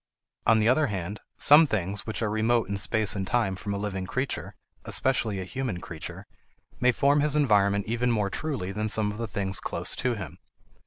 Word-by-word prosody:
On 110 - +6
the 110 0 +2
other 140 +5 +3
hand, 100 0 -4 0.2
some 150 +2 +7
things 100 -3 -2
which 110 +1 -3
are 110 - 0
remote 110 +1 +1
in 100 - -3
space 105 +2 +1
and 95 -1 -3
time 110 -6 +1
from 100 +2 -5
a 100 - -2
living 95 -2 -4
creature, 130 +5 -3 0.3
especially 115 -6 +1
a - - -3
human 110 -1 -4
creature, 80 -3 -8 0.5
may 125 0 +4
form 140 +4 +3
his 150 0 +2
environment 100 -8 +3
even 120 +2 0
more 105 -4 0
truly 135 -12 -3
than 105 +2 -2
some 105 -1 +1
of 105 - -8
the 115 - -2
things 95 -2 -2
close - - -3
to 125 -2 0
him. 100 -4 -8
110 Hz, 200 wpm, -27 LUFS, 100-125 Hz, 0.5 s, some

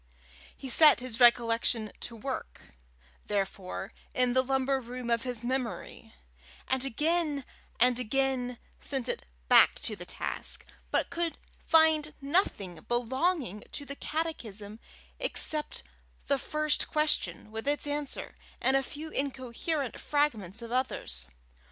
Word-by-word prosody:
He 270 - -7
set 300 +3 +7
his 245 -2 -3
recollection 230 -2 +4
to 235 - -5
work, 255 +4 -6 0.5
therefore, 195 -1 -3 0.2
in 250 -1 +3
the 260 - +5
lumber 265 +1 +1
room 245 0 -5
of 230 -1 +3
his 245 -2 -5
memory, 250 -1 -4 0.5
and 265 -1 +1
again 300 +1 0 0.3
and 250 +1 +4
again 250 0 0 0.2
sent 265 -3 -1
it - - -3 0.2
back - - +7
to - - -1
the - - -9
task, - - -4 0.2
but - - 0
could 340 -1 -1 0.3
find 315 -2 +5
nothing 275 - 0
belonging 250 - 0
to 285 - -5
the 280 - -5
catechism 225 -11 -4 0.4
except 310 -11 +2 0.4
the 280 -1 +1
first 305 +1 0
question 300 - +1
with 225 +4 -5
its 290 +1 +2
answer, 290 -1 -3 0.3
and 265 - +3
a 270 - +4
few 305 +4 -7
incoherent 270 +1 -2
fragments 235 -8 0
of 230 - -8
others. 65 - 0
260 Hz, 125 wpm, -30 LUFS, 230-290 Hz, 0.5 s, set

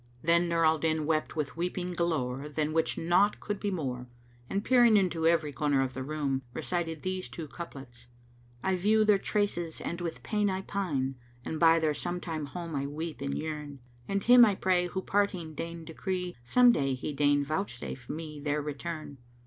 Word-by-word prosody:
Then 170 +1 +3
Nur 165 -1 +2
al 160 0 +4
Din 155 -1 0
wept 155 0 0
with 150 -3 -2
weeping 180 +1 -2
galore 150 -5 -1
than 150 +1 -1
which 160 0 +1
naught 180 +5 +3
could 205 -1 -4
be 205 - -1
more; 130 -9 -3 0.4
and 200 +1 -1
peering 240 -4 +6
into 170 -4 +2
ever 165 -3 +2
corner 145 -1 +1
of 130 -1 -3
the 130 - -5
room, 140 -1 -1
recited 165 -3 -2
these 185 0 -3
two 165 -2 -7
couplets, 135 -7 -10 0.6
"I 190 0 +2
view 215 +4 +3
their 210 -2 +5
traces 175 -6 -1
and 170 +1 -4
with 170 -2 -5
pain 210 -2 +1
I 190 0 -1
pine 145 -11 -2
* 120 0 -28
And 160 - -3
by 165 -1 +6
their 160 -2 +1
sometime 165 -1 -4
home 170 +2 -6
I 140 0 -1
weep 155 +2 -5
and 140 0 -2
yearn; 150 -3 -5 0.3
And 200 0 -1
Him 245 0 +8
I 210 -4 +5
pray 180 -2 +2
who 190 +1 -4
parting 190 -5 0
deigned 165 +1 -6
decree 180 +2 -3
* - - -28
Some 245 - +6
day 135 - +1
He 135 +3 -4
deign 145 0 +3
vouchsafe 140 -6 -4
me 155 -1 -6
their 145 +1 -1
return!" 150 -1 -6
165 Hz, 190 wpm, -30 LUFS, 145-185 Hz, 0.6 s, Him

